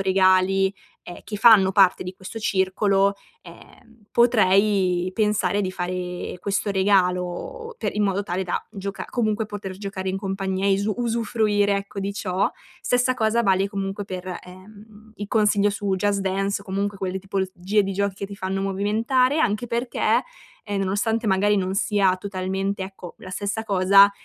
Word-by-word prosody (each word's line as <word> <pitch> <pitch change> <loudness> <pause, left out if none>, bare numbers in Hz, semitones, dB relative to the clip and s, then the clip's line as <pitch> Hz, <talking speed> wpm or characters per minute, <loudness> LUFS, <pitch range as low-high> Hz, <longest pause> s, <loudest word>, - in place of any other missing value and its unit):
regali 190 0 +3 0.3
e 175 - -10
che 210 - -5
fanno 205 -3 +6
parte 190 -3 +4
di 180 - -5
questo 190 +4 -8
circolo, 195 0 +1 0.3
ehm, 230 -2 -17
potrei 195 -5 +3
pensare 210 -2 +1
di 185 - -2
fare 180 -1 -4
questo 200 +2 -1
regalo 190 - 0
pe - - -1
in 210 - 0
modo 200 0 0
tale 185 0 -2
da 180 - -3
gioca 200 -2 -6
comunque 220 -2 0
poter 200 -3 -7
giocare 195 -1 -5
in 190 - -1
compagnia 195 0 -3
e - - +3
isu 200 +2 0
usufruire, 220 -3 +1
ecco, 200 0 -6
di 200 +1 -2
ciò. 185 -2 0 0.3
Stessa 245 +1 +2
cosa 230 0 +1
vale 195 -1 +2
comunque 195 0 -4
per, 185 -1 -7 0.2
ehm, 210 +4 -15
i 205 - -5
consiglio 210 -2 +3
su 200 -1 -2
"Just 200 +1 0
Dance" 195 +1 -1
o - - -21
comunque 200 +1 -2
quelle 190 0 -3
tipologie 190 +1 -1
di 195 0 -3
giochi 200 0 -1
che 200 - -5
ti 200 - -9
fanno 190 0 -3
movimentare 225 +8 +1
anche 215 -4 +1
perché, 240 +2 0 0.4
ehm, 205 -1 -3
nonostante 220 +4 0
magari 205 +1 +3
non 190 -1 -1
sia 195 -2 +2
totalmente, 195 0 -3
ecco, 190 -2 -9
la 185 - -10
stessa 205 +4 -3
cosa, 195 0 +6
200 Hz, 160 wpm, -23 LUFS, 190-210 Hz, 0.4 s, fanno